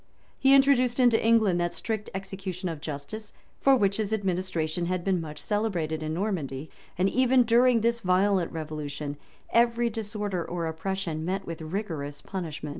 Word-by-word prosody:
] - - -35
He 270 0 +6
introduced 265 -3 +4
into 245 -3 +4
England 220 -6 +4
that 175 0 -1
strict 220 -2 -3
execution 190 -1 -4
of 160 -3 -6
justice, 155 +9 -6 0.3
for 275 -1 +5
which 200 -5 +2
his 215 -1 -1
administration 180 -5 -1
had 185 -1 -1
been 185 -2 +1
much 155 -2 -7
celebrated 180 -8 -1
in 155 0 -3
Normandy; 160 -8 -3 0.3
and 185 +2 +3
even 255 +3 +4
during 235 0 +4
this 235 +1 +1
violent 185 -2 +2
revolution, 150 -2 -5 0.4
every 235 0 +3
disorder 210 -4 -3
or 170 0 -3
oppression 165 0 -3
met 190 +3 -2
with 165 -1 -6
rigorous 155 -5 -4
punishment. 160 -6 -5
190 Hz, 160 wpm, -27 LUFS, 160-220 Hz, 0.4 s, He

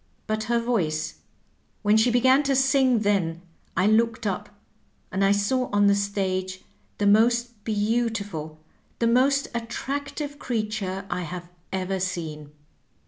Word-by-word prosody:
But 215 0 -2
her 235 +1 +1
voice 175 -11 -1 0.3
— - - -38
^when 210 +1 +5
she 230 +3 +4
began 260 +3 +4
to 275 -2 +1
sing 265 -3 +3
then 180 -5 0 0.3
I 185 - +3
looked 225 +1 +2
up, 195 -3 -2 0.6
and 190 +1 0
I 195 - +4
saw 205 +6 +1
on 205 0 +3
the 200 - +6
stage 190 -2 -2 0.3
the 205 - 0
most 235 +1 +3
beautiful, 205 -8 -1 0.4
the 235 - 0
most 265 +4 +3
attractive 280 +5 -4
creature 215 -4 -3
I 180 +1 -1
have 175 +1 -6 0.2
ever 190 0 -2
seen. 160 -5 -4
210 Hz, 140 wpm, -25 LUFS, 190-240 Hz, 0.6 s, the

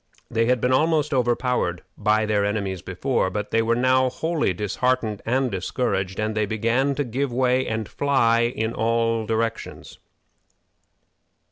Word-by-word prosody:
They 115 0 +1
had 125 0 +2
been 125 +2 +1
almost 150 +1 +2
overpowered 120 -7 0
by 110 +1 +1
their 105 -1 +1
enemies 100 -3 -2
before, 95 +4 -1
but 105 +2 -4
they 115 - +3
were 115 +1 +1
now 130 +1 +3
wholly 160 - -1
disheartened 105 +3 -1
and 130 +1 +1
discouraged, 95 0 -2
and 110 0 -1
they 105 -1 0
began 115 +6 0
to 145 - 0
give 130 +2 -2
way 130 +1 +1
and 110 -2 -3
fly 120 -5 +2
in 110 +1 -2
all 115 -1 0
directions. 115 0 -3
115 Hz, 145 wpm, -23 LUFS, 110-130 Hz, -, they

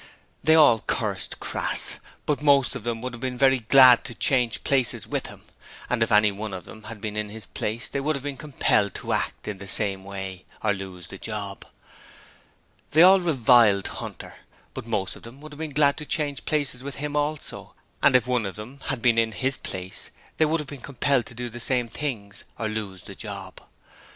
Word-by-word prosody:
They 160 - +6
all 145 -8 +7
cursed - - -2
Crass, - - 0 0.3
but 145 -1 0
most 140 -3 +4
of - - -6
them 115 -1 -3
would 125 -1 -4
have 120 - -8
been 130 -1 -3
very 135 0 +4
glad 125 +1 +7
to 120 - -6
change 125 -1 +1
places 130 -4 +1
with - - -3
him: - - -12 0.5
and 125 -2 0
if 115 - +2
any 105 0 +5
one 100 0 -5
of 90 - -8
them 110 -1 -12
had 115 -3 -8
been 105 -1 -4
in 105 -1 -2
his 110 -1 -8
place 115 +4 -3
they 140 - -3
would 155 +2 0
have 140 - -5
been 145 -1 -4
compelled 125 -8 +1
to - - -2
act - - -2
in 105 -3 -4
the 100 - -9
same 95 -1 +1
way 95 -1 -7 0.2
or 105 -2 +3
lose 95 -2 -7
the 95 - -10
job. 100 -3 -5 1.3
They 160 +3 +8
all 190 +2 +8
reviled 120 - +4
Hunter, - - -8 0.4
but - - -7
most 100 -4 -1
of - - -13
them 120 +4 -12
would 155 0 -10
have 145 - -11
been 160 -1 -3
glad 140 0 +3
to 150 - -5
change 145 -4 -2
places 145 -5 -1
with 140 0 -6
him 150 +1 -4
also: 150 +1 -3 0.3
and - - +5
if 125 -2 +5
any - - -2
one 120 -5 +1
of 95 - -7
them 120 +6 -9
had 135 -4 -2
been 120 -2 +4
in 110 -1 +1
his 130 +4 0
place 95 0 -6 0.3
they 160 - +4
would 160 +2 +1
have 150 - -4
been 140 -2 -9
compelled 135 -2 0
to 125 - -10
do 120 +1 -4
the 120 0 -8
same 125 0 0
things, 110 -6 -5
or 110 - -2
lose 105 -4 -5
the 100 - -9
job. 100 -2 -7
120 Hz, 215 wpm, -25 LUFS, 105-140 Hz, 1.3 s, They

